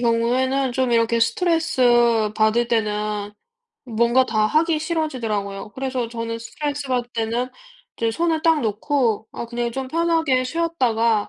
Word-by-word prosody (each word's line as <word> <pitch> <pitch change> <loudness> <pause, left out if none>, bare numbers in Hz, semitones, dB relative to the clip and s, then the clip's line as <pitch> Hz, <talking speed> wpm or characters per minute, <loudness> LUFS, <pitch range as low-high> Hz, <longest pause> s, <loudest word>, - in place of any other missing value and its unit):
경우에는 250 +3 +1
좀 255 -1 0
이렇게 230 0 +2
스트레스받을 240 - +2
때는 210 -2 -1 0.5
뭔가 235 +2 +2
다 215 -1 +1
하기 315 +4 +2
싫어지더라고요. 225 - -3
그래서 260 -1 -3
저는 230 -1 -4
스트레스받을 260 -1 -3
때는 230 +2 -1 0.5
이제 230 -1 0
손을 325 +5 0
딱 325 -2 +3
놓고 225 0 0
아 - - -5
그냥 235 0 -3
좀 265 +1 -4
편하게 320 -5 +1
쉬었다가 245 -9 0
240 Hz, 315 characters per minute, -22 LUFS, 225-275 Hz, 0.5 s, 딱